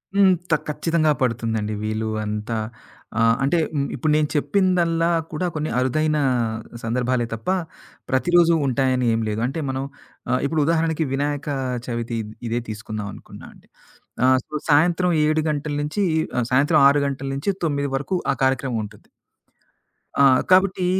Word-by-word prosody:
హ్మ్. 195 -2 +6 0.2
త - - +5
ఖచ్చితంగా 155 +1 +1
పడుతుందండి. 115 -3 -1
వీళ్ళు 110 +1 -2 0.2
అంతా 105 +2 -3 0.6
ఆహ్, 115 0 +4
అంటే 140 +6 +2
హ్మ్ 140 -3 -1
ఇప్పుడు 150 +4 0
నేను 155 -1 +2
చెప్పిందల్లా 170 +1 +2 0.2
కూడా 165 +3 -2
కొన్ని 155 0 -2
అరుదైన 155 +4 +1 0.7
సందర్భాలే 125 +1 0
తప్ప, 115 0 -8 0.6
ప్రతిరోజు 170 +5 +4
ఉంటాయని 130 -1 +1
ఏం 115 - 0
లేదు. 105 +1 -2
అంటే 135 +5 -4
మనం 130 0 -2 0.5
ఆహ్, 125 +1 +2
ఇప్పుడు 155 +2 0
ఉదాహరణకి 160 0 +1
'వినాయక 145 +1 -2 0.4
చవితి' 115 -1 -3
ఇ - - -5 0.3
ఇదే 120 - 0
తీసుకుందాం 110 -1 -5
అనుకున్నా - - -12
అండి. - - -22 0.6
ఆహ్, 130 0 +5
సో, - - -20 0.2
సాయంత్రం 175 +4 +3
7 155 +1 +1
గంటల 150 0 -2
నుంచి 150 +8 -1 0.3
ఆహ్, 125 - +1
సాయంత్రం 145 +5 +3
గంటల 140 - +9
6 145 0 +1
గంటల 135 0 -4
నుంచి 140 +9 -1
9 140 -2 -1
వరకు 145 +7 -2 0.2
ఆ - - -6
కార్యక్రమం 130 -3 0
ఉంటుంది. 105 0 -15 1.1
ఆ! - - +6 0.3
కాబట్టి 185 0 +4
140 Hz, 150 wpm, -22 LUFS, 120-160 Hz, 1.1 s, గంటల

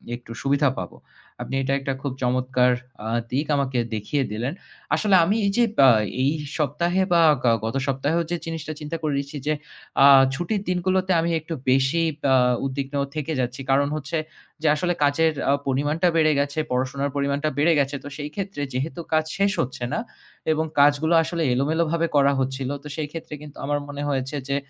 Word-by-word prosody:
একটু 120 -1 -12
সুবিধা 140 +1 +2
পাব। - - -5 0.5
আপনি - - -4
এটা 135 +1 0
একটা 135 0 -2
খুব 140 - -3
চমৎকার 125 0 +2 0.3
আ - - -3 0.2
দিক 140 +4 0
আমাকে 135 -3 0 0.2
দেখিয়ে 135 +7 -1
দিলেন। 120 +7 -2 0.4
আসলে 205 -3 +3
আমি 195 +6 +1
এই 200 - +2
যে 240 - +5 0.2
আ - - +9 0.3
এই 140 - +3 0.3
সপ্তাহে 170 +5 0
বা 170 - +5 0.2
গা 120 - +4
গত 115 - -3
সপ্তাহেও 140 +5 0
যে 175 - 0
জিনিসটা 165 -1 -5
চিন্তা 150 +2 -5
করে 155 -2 -1
রেখেছি 140 +1 -6
যে 155 - +3 0.5
আ - - +9 0.3
ছুটির 175 +7 -2
দিনগুলোতে 185 +1 +1
আমি 170 +1 0
একটু 160 +2 -7 0.2
বেশিই 135 +6 +3 0.3
আ - - +6 0.3
উদ্বিগ্ন 135 +1 -4 0.2
থেকে 155 +1 -3
যাচ্ছি। 125 +1 -2
কারণ 140 +1 +3
হচ্ছে 155 +2 -3 0.4
যে 160 - +1
আসলে 175 +4 0
কাচের 160 +3 +3 0.2
আ - - +5 0.2
পরিমাণটা 145 +6 +1
বেড়ে 155 -1 +4
গেছে, 140 +2 -1
পড়াশোনার 130 +3 -1
পরিমাণটা 140 +2 0
বেড়ে 160 +4 +4
গেছে। 140 0 0
তো - - -7
সেই 145 -1 -5
ক্ষেত্রে 195 -6 -4
যেহেতু 150 +7 -3
কাজ 155 0 +3
শেষ 200 0 +2
হচ্ছে 125 0 -5
না, - - 0 0.5
এবং 155 0 +1
কাজগুলো 145 +3 +4
আসলে 170 0 -2
এলোমেলোভাবে 160 +5 +1
করা 140 -1 +5
হচ্ছিল, 130 0 -2
তো - - -8
সেই 155 -2 -3
ক্ষেত্রে 165 -1 -8
কিন্তু 150 -1 -11
আমার 145 +1 0
মনে 145 0 -6
হয়েছে 135 +1 -2
যে 140 - +1
145 Hz, 180 wpm, -23 LUFS, 135-165 Hz, 0.5 s, আ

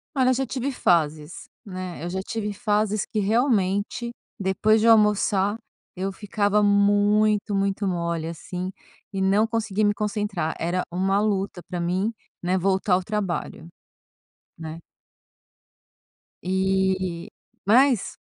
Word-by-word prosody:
Olha, 255 -1 +3
eu - - +3
já 265 +1 -1
tive 265 +2 -3
fases 155 -5 0 0.2
né, 185 -4 -6
eu 175 - -3
já 190 - -3
tive 210 -1 -3
fases 210 -1 0
que, 215 - -3
realmente, 210 0 +1 0.3
depois 215 +3 +2
de 230 - +3
eu - - +8
almoçar, 210 -1 +2 0.4
eu 190 +2 -2
ficava 205 +1 0
muito, 205 +1 +3
muito 195 0 0
mole, 170 -2 -2
assim, 180 +3 -5 0.4
e 195 - -2
não 200 +3 +3
consegui 220 -2 -1
me 205 - +3
concentrar, 205 -6 -2
era 175 +2 -1
uma 190 +3 +1
luta 195 -3 -1
pra 180 - -3
mim, 185 +5 0 0.3
né, 180 +1 +1
voltar 190 +1 +1
ao 185 - +2
trabalho, 185 -5 -3 0.9
né. 160 0 -7 1.6
Eh, 190 -2 0 0.4
mas, 250 +2 +3
195 Hz, 130 wpm, -24 LUFS, 185-210 Hz, 1.6 s, eu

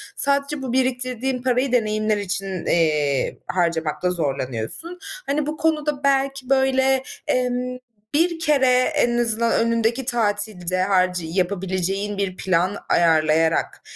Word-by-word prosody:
Sadece 280 +1 0
bu 255 -2 -4
biriktirdiğin 255 0 -1
parayı 255 +1 +1
deneyimler 215 -3 +1
için, 195 -2 -3
iii, 150 -5 +1
harcamakta 170 -1 0
zorlanıyorsun. 140 - -3 0.3
Hani, 290 +1 -1
bu 305 +1 -4
konuda 300 -3 0
belki 270 -1 0
böyle, 265 0 +2 0.2
emm, 250 0 -1 0.4
bir 335 +2 +2
kere 295 -5 +3 0.3
en 240 -5 +2
azından 230 -1 +1
önündeki 230 +2 0
tatilde 205 -6 0
harcı 185 -2 +1
yapabileceğin 190 +3 -2
bir 195 -2 -2
plan 185 +2 0
ayarlayarak 160 -1 +2
225 Hz, 110 wpm, -22 LUFS, 180-265 Hz, 0.4 s, kere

